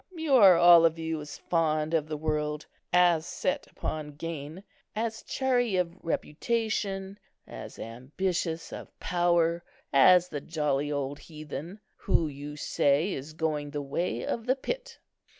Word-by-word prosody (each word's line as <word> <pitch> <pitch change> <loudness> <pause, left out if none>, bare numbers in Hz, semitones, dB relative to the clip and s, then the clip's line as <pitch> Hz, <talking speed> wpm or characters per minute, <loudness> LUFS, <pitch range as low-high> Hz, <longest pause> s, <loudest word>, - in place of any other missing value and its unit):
You 320 -4 -1
are 195 -6 +8
all 175 -1 +8
of 165 0 +3
you 160 -1 -3
as 145 0 -8
fond 155 -2 0
of 155 -2 +1
the 155 -1 -4
world, 150 0 -2 0.3
as 175 -3 +4
set 275 - -2
upon 150 -2 -5
gain, 160 +3 -6 0.3
as 225 0 -2
chary 245 -5 0
of 180 -2 0
reputation, 195 +3 -2 0.3
as - - -9
ambitious 160 +8 -3
of - - -10
power, 175 -1 +1 0.3
as 180 +6 +6
the 145 -2 -4
jolly 150 -3 -1
old 140 0 -3
heathen, 155 +5 -8 0.2
who, 165 - +1
you 145 +1 -7
say, 145 +4 +1
is 140 +4 -7
going 155 -2 -2
the 145 0 -4
way 135 -3 -2
of 230 +1 -3
the 260 - +3
pit." - - -5
165 Hz, 145 wpm, -28 LUFS, 150-185 Hz, 0.3 s, are